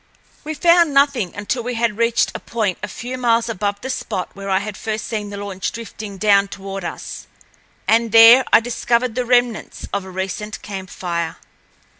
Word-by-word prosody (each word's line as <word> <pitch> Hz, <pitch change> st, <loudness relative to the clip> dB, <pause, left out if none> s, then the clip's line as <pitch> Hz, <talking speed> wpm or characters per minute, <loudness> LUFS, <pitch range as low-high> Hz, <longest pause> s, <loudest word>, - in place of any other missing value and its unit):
We 310 Hz, +1 st, -4 dB
found 335 Hz, -1 st, +4 dB
nothing 275 Hz, -10 st, +2 dB
until 205 Hz, +5 st, -2 dB
we 245 Hz, +1 st, -4 dB
had 230 Hz, -2 st, 0 dB
reached 235 Hz, 0 st, +2 dB
a -, -, -5 dB
point 215 Hz, -6 st, -2 dB
a -, -, -3 dB
few 250 Hz, +2 st, -6 dB
miles 230 Hz, -1 st, +2 dB
above 205 Hz, -1 st, -2 dB
the 265 Hz, -, -5 dB
spot 245 Hz, -8 st, -3 dB
where 195 Hz, 0 st, -7 dB
I 190 Hz, -, +3 dB
had 205 Hz, +1 st, -4 dB
first 215 Hz, +1 st, -4 dB
seen 210 Hz, -2 st, -4 dB
the 200 Hz, -, -7 dB
launch 200 Hz, -2 st, -4 dB
drifting 215 Hz, -3 st, -8 dB
down 200 Hz, 0 st, +4 dB
toward 195 Hz, 0 st, -7 dB
us, -, -, -7 dB, 0.6 s
and 230 Hz, 0 st, +3 dB
there 230 Hz, +3 st, +9 dB
I -, -, +7 dB
discovered 240 Hz, 0 st, 0 dB
the 250 Hz, +1 st, -2 dB
remnants 245 Hz, -2 st, 0 dB
of 200 Hz, -, -1 dB
a 190 Hz, -, -10 dB
recent 190 Hz, +3 st, -4 dB
camp 190 Hz, -2 st, -7 dB
fire. 170 Hz, -2 st, -3 dB
220 Hz, 185 wpm, -20 LUFS, 195-240 Hz, 0.6 s, there